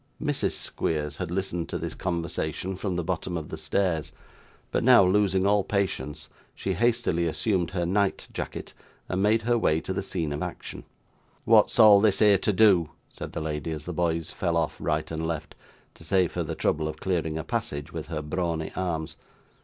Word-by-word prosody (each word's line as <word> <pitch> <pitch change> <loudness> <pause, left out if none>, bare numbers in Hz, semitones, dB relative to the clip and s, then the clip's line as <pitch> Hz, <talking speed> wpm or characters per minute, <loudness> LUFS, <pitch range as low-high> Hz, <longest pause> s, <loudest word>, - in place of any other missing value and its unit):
Mrs. 145 -2 0
Squeers 75 -2 -2
had 90 -3 -4
listened 90 -2 -2
to - - -2
this - - -4
conversation, 85 0 -3
from 95 -1 -3
the 90 - -1
bottom 90 0 -2
of 80 -2 -6
the - - -4
stairs; 80 0 0 0.6
but, - - 0
now 125 -4 +7
losing 95 0 +3
all 100 0 +3
patience, 95 -9 -2 0.3
she 95 - -2
hastily 115 -5 +1
assumed 90 +1 0
her 90 -2 -1
night 100 +2 0
jacket, - - -5 0.3
and 95 +1 -1
made 110 +2 +3
her 120 0 +2
way 80 -7 +2
to 95 - -3
the 95 - -1
scene 85 -6 -3
of 75 - -4
action. - - -6 0.6
'What's - - +5
all 105 -2 +8
this 105 -3 +3
here 105 -3 +5
to 105 - +1
do?' 95 -5 +5 0.2
said - - -8
the - - -3
lady, 75 +1 -3
as 75 -2 -5
the 90 - -4
boys 85 -1 -1
fell 85 -2 -1
off 80 -2 0
right 75 +1 -1
and 80 0 -2
left, 80 -1 -4 0.4
to - - -13
save 90 +1 +2
her - - -1
the - - -3
trouble 80 0 0
of 80 - -5
clearing 80 -4 -1
a 80 - -3
passage 70 +1 -3
with 80 -2 -5
her 75 -2 -4
brawny 80 0 -2
arms. 80 -4 -3
90 Hz, 195 wpm, -27 LUFS, 80-95 Hz, 0.6 s, all